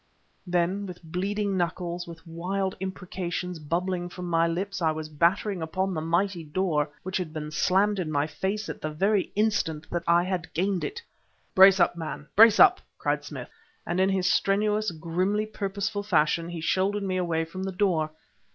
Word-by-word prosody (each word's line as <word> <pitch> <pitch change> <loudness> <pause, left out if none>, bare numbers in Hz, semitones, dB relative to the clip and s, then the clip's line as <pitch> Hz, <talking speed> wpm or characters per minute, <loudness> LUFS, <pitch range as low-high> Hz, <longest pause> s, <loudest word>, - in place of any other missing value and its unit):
Then, 180 +3 0
with 180 -1 -9
bleeding 195 +4 -2
knuckles, 175 0 -2
with 165 -1 -11
wild 185 +4 -2
imprecations 180 -2 -4
bubbling 175 +3 -2
from 180 0 -7
my 165 -1 +3
lips, 190 +3 -3
I 160 - +3
was 155 0 -4
battering 175 +5 +1
upon 185 +4 -1
the 155 - -2
mighty 170 +2 0
door 150 -2 0
which 190 +1 -2
had 180 -4 -4
been 150 -1 -5
slammed 195 +6 +2
in 160 -4 -2
my 145 -1 +1
face 190 +8 -3
at - - -6
the 155 - -2
very 195 +6 +1
instant 205 -7 0
that 175 - -1
I 170 +1 +5
had 180 -2 -3
gained 185 +2 0
it. 465 +3 -5 0.5
"Brace 190 0 +8
up, 175 - +3
man! 160 -3 -6
Brace 220 0 +8
up!" 375 -1 +7 0.2
cried - - -1
Smith, - - -8 0.3
and 175 - -1
in 190 +1 +4
his 190 -2 0
strenuous, 210 +3 +2
grimly 180 +6 -1
purposeful 205 0 -3
fashion, 165 -3 +1
he 170 -2 -5
shouldered 195 +5 +1
me 185 -1 -1
away 165 -3 0
from 185 +3 -7
the 190 0 -2
door. 180 -5 +1
180 Hz, 180 wpm, -27 LUFS, 165-195 Hz, 0.5 s, Brace